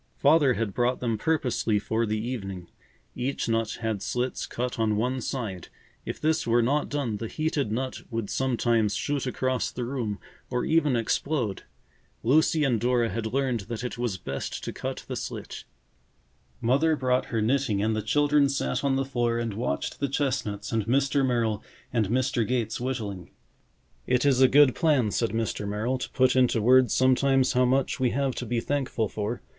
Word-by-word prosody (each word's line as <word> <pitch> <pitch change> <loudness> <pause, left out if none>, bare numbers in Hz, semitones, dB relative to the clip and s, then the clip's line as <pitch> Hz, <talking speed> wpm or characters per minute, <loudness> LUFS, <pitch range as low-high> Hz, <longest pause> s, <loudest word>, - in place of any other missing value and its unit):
Father 145 -3 +4
had 110 -4 -2
brought 125 +3 +1
them 115 -3 -1
purposely 120 -5 0
for 110 +2 -1
the 110 +1 -1
evening. 95 -6 -5 0.5
Each 130 +1 -2
nut 115 -1 0
had 110 -3 -2
slits 125 +1 -2
cut 125 0 -3
on 110 -1 +2
one 125 +4 -1
side. 110 -9 -4 0.4
If - - -4
this 155 -2 +1
were 120 +1 +3
not 145 +5 +1
done, 135 -7 -2
the 115 - -4
heated 150 -4 -1
nut 130 +3 -3
would 115 -3 -3
sometimes 120 -4 +1
shoot 145 -2 -2
across 130 0 -1
the 125 - -4
room 120 -5 -3 0.3
or 125 -1 -1
even 155 -5 +2
explode. 115 -1 -1 0.6
Lucy 155 +5 +3
and 125 -6 +1
Dora 120 -1 +2
had 110 -1 -3
learned 130 -3 0
that 115 0 -4
it 125 -1 -5
was 120 -6 -1
best 70 -5 -5
to - - -4
cut - - -5
the - - -4
slit. - - -6 1.0
Mother 140 +7 +3
brought 130 -2 +1
her 115 - -2
knitting 110 -3 +1
and 110 0 +1
the 110 - -1
children 145 +2 +3
sat 65 - -1
on 140 -1 +2
the 135 0 0
floor 120 -3 0
and 115 -2 -2
watched 115 +5 -3
the 140 - -1
chestnuts 125 -7 -2
and 110 -2 -1
Mr. 135 +2 +2
Merrill 115 -5 0 0.3
and 110 -5 +1
Mr. 120 -2 +1
Gates 120 -2 -1
whittling. 105 -8 -4 0.8
"It 125 +1 +2
is 135 -2 +4
a 130 - +8
good 140 -1 +6
plan," 145 - +2
said 115 +2 0
Mr. 110 -2 -2
Merrill, 110 +6 -1
"to - - -4
put 130 -1 +2
into 125 -2 +3
words 125 +2 +5
sometimes 130 0 +3
how 125 0 +3
much 130 +2 +1
we 130 -1 +2
have 135 +1 0
to - - -4
be 120 -1 0
thankful 130 -4 -1
for. 105 +4 -4
125 Hz, 180 wpm, -27 LUFS, 110-135 Hz, 1.0 s, a